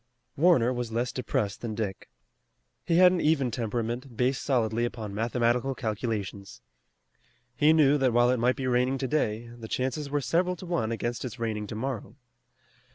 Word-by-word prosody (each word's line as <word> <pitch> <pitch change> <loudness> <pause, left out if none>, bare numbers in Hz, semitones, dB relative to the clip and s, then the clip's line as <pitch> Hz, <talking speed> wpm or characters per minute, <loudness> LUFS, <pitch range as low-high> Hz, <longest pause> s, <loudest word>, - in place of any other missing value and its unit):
Warner 135 -7 +4
was 120 -2 -4
less 120 +2 -1
depressed 110 -5 -2
than 115 -3 -4
Dick. 100 -4 -4 0.7
He 165 - +1
had 180 0 +8
an 180 - 0
even 140 -5 +2
temperament 120 +2 -3
based 125 +2 +1
solidly 120 -4 +1
upon 110 -4 -4
mathematical 120 +4 0
calculations. 105 -4 -4 1.0
He 150 +3 +5
knew 150 -2 +4
that 130 -2 +3
while 120 +1 +4
it 125 - +1
might 125 +2 +2
be 135 - -4
raining 125 +1 +2
today, 120 -5 -1
the 115 -2 -9
chances 130 +5 -2
were 145 +1 0
several 170 +8 +1
to 185 - -10
one 165 -11 -1
against 120 +1 -3
its 125 -2 -6
raining 110 -2 -3
tomorrow. 115 +1 -5
120 Hz, 160 wpm, -28 LUFS, 115-135 Hz, 1.0 s, had